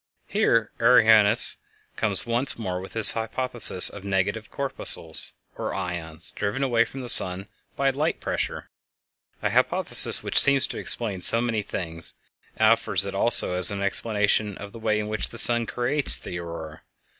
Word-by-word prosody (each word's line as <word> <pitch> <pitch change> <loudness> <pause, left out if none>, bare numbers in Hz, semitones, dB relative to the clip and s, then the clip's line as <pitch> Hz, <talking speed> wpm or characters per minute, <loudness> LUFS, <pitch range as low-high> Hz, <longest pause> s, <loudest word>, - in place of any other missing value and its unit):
Here 115 - -1
Arrhenius 110 -2 +3 0.4
comes 105 -4 -4
once 120 +2 -4
more 95 -5 -6
with 95 - -13
his 110 -2 +9
hypothesis 115 -3 +1
of 100 - -6
negative 100 +2 -4
corpuscles, 130 - 0 0.2
or - - -7
ions, 85 -4 -7
driven 105 +7 -5
away 120 -3 0
from 135 +4 -11
the 125 - -9
sun 95 -3 +2 0.3
by 135 0 -1
light 150 +5 -4
pressure—a - - -9
hypothesis - - +6
which - - 0
seems 135 -1 +2
to - - -8
explain 105 -6 -6
so 115 - +4
many 115 -3 -3
things—and 85 -5 -6
offers - - +1
it - - -7
also - - +3
as 90 -1 +8
an 100 -1 -4
explanation 105 0 -2
of 100 0 -12
the 115 - -13
way 110 -1 -2
in 105 - -6
which 110 0 -3
the 115 - -12
sun 120 -1 -1
creates 130 +4 -1
the 85 - -9
Aurora. 80 -2 -10
110 Hz, 155 wpm, -22 LUFS, 95-120 Hz, 0.4 s, his